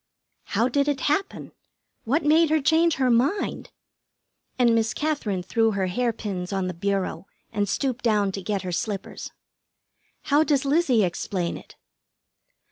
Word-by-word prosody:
'" - - -51
"How 230 +3 +3
did 280 +3 +1
it 290 -1 0
happen? 310 +7 -1 0.5
What 290 +7 +1
made 315 +2 +4
her 315 0 +3
change 320 +3 +3
her 260 -2 +2
mind?" 270 - 0 0.9
and 240 -2 +4
Miss 225 -1 +1
Katherine 260 -12 -1
threw 225 +3 +1
her 195 -1 0
hair 235 +6 0
pins 195 -5 -5
on 195 -1 -1
the 180 - -3
bureau 195 +2 -2 0.3
and 205 -2 0
stooped 260 +3 -2
down 210 -4 +2
to 195 - -5
get 200 +1 -2
her 180 - -4
slippers. 200 +1 -4 0.9
"How 295 +2 +3
does 285 -3 +1
Lizzie 275 -6 +3
explain 175 0 -2
it?" - - -12
230 Hz, 155 wpm, -24 LUFS, 195-285 Hz, 0.9 s, made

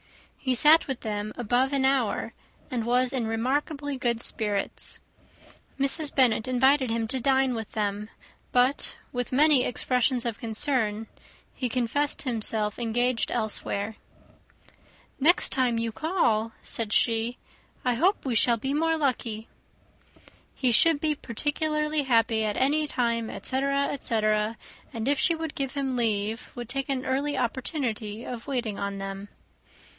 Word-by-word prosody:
He 260 -2 0
sat 305 +6 +6
with 265 -3 -3
them 210 -1 -3
above 245 +3 +1
an 275 -2 +1
hour, 265 -5 0 0.4
and 240 -3 -1
was 250 +2 +2
in 245 -4 -1
remarkably 280 +5 -1
good 235 -2 +1
spirits. 210 -3 -1 0.8
Mrs. 280 +2 +1
Bennet 245 -4 +3
invited 260 +1 +3
him 225 0 -1
to 260 - 0
dine 265 0 +2
with 225 -2 -6
them; 210 0 -2 0.4
but, 250 +3 +2 0.2
with 245 -1 -3
many 285 0 +5
expressions 250 0 0
of 230 -2 -2
concern, 225 -2 0 0.5
he 250 - -3
confessed 255 +5 -1
himself 220 -4 0
engaged 240 +1 0
elsewhere. 215 -2 -2 1.2
"Next 320 +6 +4
time 250 -3 +1
you 230 0 -1
call," 230 - 0
said 225 -3 -2
she, 230 +2 +1 0.5
"I 250 - +3
hope 355 - +1
we 260 - 0
shall 235 +1 +3
be 270 +5 -3
more 325 +2 +1
lucky." 235 -6 -2 1.1
He 255 -2 +1
should 310 +6 +5
be 305 0 +1
particularly 300 +4 -1
happy 230 -4 +2
at 210 -1 -1
any 295 +3 +2
time, 235 -4 -1
etc., 275 +1 -1
etc.; 215 -4 0 0.3
and 225 +1 -4
if 285 0 +2
she 335 -3 +3
would 320 -2 -5
give 270 -1 -3
him 270 -2 -2
leave, 220 -1 -1
would 240 -2 -6
take 275 +2 -3
an 260 -2 -1
early 275 +2 -1
opportunity 235 -3 -3
of 240 0 -7
waiting 240 -7 -2
on 200 0 -3
them. 195 +1 -6
245 Hz, 140 wpm, -26 LUFS, 225-275 Hz, 1.2 s, sat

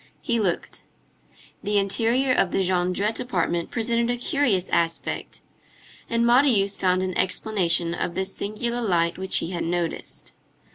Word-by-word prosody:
He 235 -2 0
looked. 185 -5 -2 0.8
The 205 0 0
interior 230 +6 +2
of 190 - +2
the 190 +1 0
Jondrette 185 +4 0
apartment 175 -7 -1
presented 235 0 0
a 245 - +1
curious 245 - +1
aspect, 165 -1 -1 0.7
and 230 0 +1
Marius 235 -5 +4
found 185 0 +1
an 185 -1 -3
explanation 180 -3 +1
of 175 0 -3
the 190 - -1
singular 215 +5 -3
light 175 -5 +1
which 190 0 +1
he 170 - -2
had 175 - -3
noticed. 170 0 -3
195 Hz, 140 wpm, -24 LUFS, 180-235 Hz, 0.8 s, Marius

